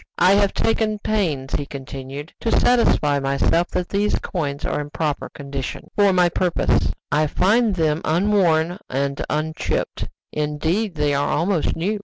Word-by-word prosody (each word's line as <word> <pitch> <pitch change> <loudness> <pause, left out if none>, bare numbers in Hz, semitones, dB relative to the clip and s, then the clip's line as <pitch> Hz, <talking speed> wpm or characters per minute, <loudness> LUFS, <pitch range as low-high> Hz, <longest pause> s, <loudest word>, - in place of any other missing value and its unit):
"I 180 +2 +5
have 200 -1 +3
taken 220 -1 +1
pains," 165 -12 -1
he 145 -1 -1
continued, 140 +2 -8
"to 230 - -1
satisfy 150 -12 +3
myself 140 +5 +1
that 180 0 -2
these 205 +1 +1
coins 145 -6 -3
are - - -1
in 145 - -7
proper 150 -1 -2
condition 140 -2 -6
for 200 -1 +4
my 180 -1 +4
purpose. 175 0 +1 0.2
I 150 +1 +3
find 210 +6 +2
them 160 -2 +1
unworn 175 -1 +2
and 140 +1 -1
unchipped; 155 +1 -2 0.2
indeed, 160 +7 -1
they 150 -1 +1
are 140 +1 +1
almost 170 +1 +1
new. 205 +6 -1
160 Hz, 150 wpm, -22 LUFS, 145-195 Hz, 0.2 s, I